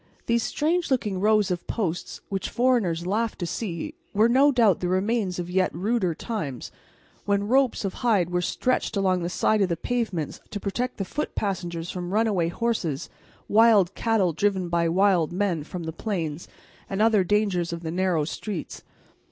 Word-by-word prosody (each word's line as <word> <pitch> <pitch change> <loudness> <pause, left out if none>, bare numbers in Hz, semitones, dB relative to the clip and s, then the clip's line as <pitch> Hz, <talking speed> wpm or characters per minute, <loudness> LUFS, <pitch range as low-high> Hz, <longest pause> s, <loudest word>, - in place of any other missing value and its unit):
These 235 0 +2
strange 330 +8 0
looking 215 -8 0
rows 210 -1 +3
of 175 -1 -3
posts, 180 -7 -3
which 195 -1 -2
foreigners 225 -10 +1
laughed 220 +4 -1
to 175 - -3
see, 195 - -4 0.2
were 215 +3 +5
no 270 +4 +5
doubt 230 -8 +4
the 180 - -2
remains 190 +1 0
of 175 -1 -3
yet 185 +1 +1
ruder 195 -3 0
times, 155 - -5 0.5
when 200 0 +1
ropes 255 -2 +2
of 195 - -2
hide 200 -8 +2
were 180 0 +1
stretched 255 +4 -1
along 185 -2 +2
the 170 - -2
side 215 +3 +2
of 190 - +2
the 170 - -1
pavements 200 -7 -2
to 205 - -5
protect 245 +6 -3
the 195 - -2
foot 295 +10 -4
passengers 175 -4 -3
from 180 -1 -5
runaway 210 -6 +2
horses, 175 - -2 0.4
wild 210 -4 +5
cattle 210 -7 +1
driven 190 0 0
by 170 -1 +1
wild 185 -2 +3
men 180 -4 0
from 175 +3 -6
the 160 0 -5
plains, 170 -5 -3 0.4
and 195 - -3
other 215 -3 +4
dangers 185 -3 +1
of 170 0 -5
the 160 - -3
narrow 175 -3 +1
streets. 185 +2 -5
195 Hz, 175 wpm, -25 LUFS, 175-225 Hz, 0.5 s, were